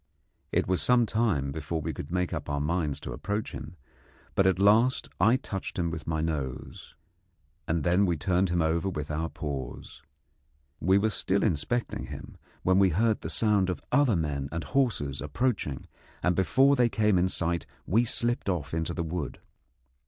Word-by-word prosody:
It - - +1
was 95 0 +1
some 125 -1 +4
time 105 - 0
before 80 +2 -3
we 80 +1 -3
could 70 - -7
make 90 0 0
up - - -4
our 70 -1 -1
minds 75 -1 -1
to - - -6
approach 100 - -3
him, - - -8 0.6
but 95 - +3
at 95 - +3
last 110 +6 +4
I 110 +7 +5
touched 100 -7 -5
him 85 -2 0
with 80 -1 -6
my 80 -1 0
nose, 75 -7 -4 0.7
and 80 -2 0
then 90 +4 +3
we 85 -2 +1
turned 90 +4 +1
him 85 -1 +1
over 85 +4 +1
with 75 -4 -4
our 80 +2 -2
paws. 70 -5 -6 0.8
We 95 +4 +4
were 110 +2 +2
still 100 -1 0
inspecting 110 +6 -1
him, - - -9 0.3
when 95 +1 +4
we 95 -1 +5
heard 110 +6 +1
the - - -5
sound 105 -4 +2
of 90 - -2
other 140 -7 +4
men 70 -4 -2
and 80 0 -3
horses 75 - 0
approaching, 75 - -1 0.4
and 90 0 +2
before 130 - +4
they 120 -2 +3
came 105 -2 +2
in 90 +1 +2
sight 85 -1 -2 0.2
we 110 +7 +3
slipped 120 -2 0
off 80 -6 -2
into 80 -1 -2
the 85 - -1
wood. 80 -3 -4
90 Hz, 180 wpm, -28 LUFS, 80-105 Hz, 0.8 s, I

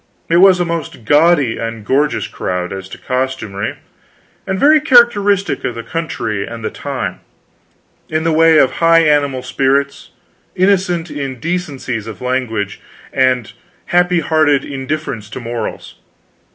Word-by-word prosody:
It 170 - +5
was 185 0 +6
a 175 - +1
most 165 -8 -5
gaudy 145 -4 +3
and 115 -2 -5
gorgeous 145 +5 +1
crowd, 90 0 -4
as 95 -1 -7
to - - -9
costumery, 125 -6 -3 0.7
and 190 0 -2
very 305 +1 +5
characteristic 210 -8 +3
of 120 - -3
the 115 - -6
country 135 -11 -3
and 115 +1 -7
the 110 - -2
time, 130 -11 -5 0.9
in 155 0 -1
the 165 - +1
way 160 0 +5
of 130 -3 +4
high 165 0 +5
animal 145 -4 +1
spirits, 140 +2 0 0.5
innocent 180 -3 +1
indecencies 140 - -4
of 110 - -8
language, 120 -6 -2 0.3
and 130 -4 +1 0.4
happy 180 -1 +3
hearted 155 -3 +2
indifference 135 -5 -4
to 125 - -7
morals. 115 -2 -5
140 Hz, 135 wpm, -16 LUFS, 115-170 Hz, 0.9 s, was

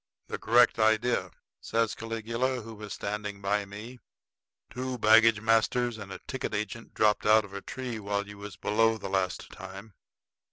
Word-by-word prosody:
"The - - -4
correct 120 0 +4
idea," 110 +2 +2 0.3
says 115 -1 0
Caligula, 115 +3 -2
who 115 +1 -9
was 105 -1 -9
standing 105 0 -4
by 100 +1 0
me. 105 +5 -9 0.7
"Two 130 0 -4
baggage 110 0 +6
masters 115 +1 +2
and 100 -2 -8
a - - -5
ticket 130 -5 -3
agent 105 +3 -5
dropped 105 0 +2
out 110 0 +6
of 100 - -14
a 100 - -5
tree 125 -4 -5
while 100 0 -2
you 105 0 -11
was 100 -2 -8
below 110 +3 +2
the 105 - -6
last 95 -2 -1
time. 95 +3 -10
110 Hz, 165 wpm, -29 LUFS, 105-115 Hz, 0.7 s, baggage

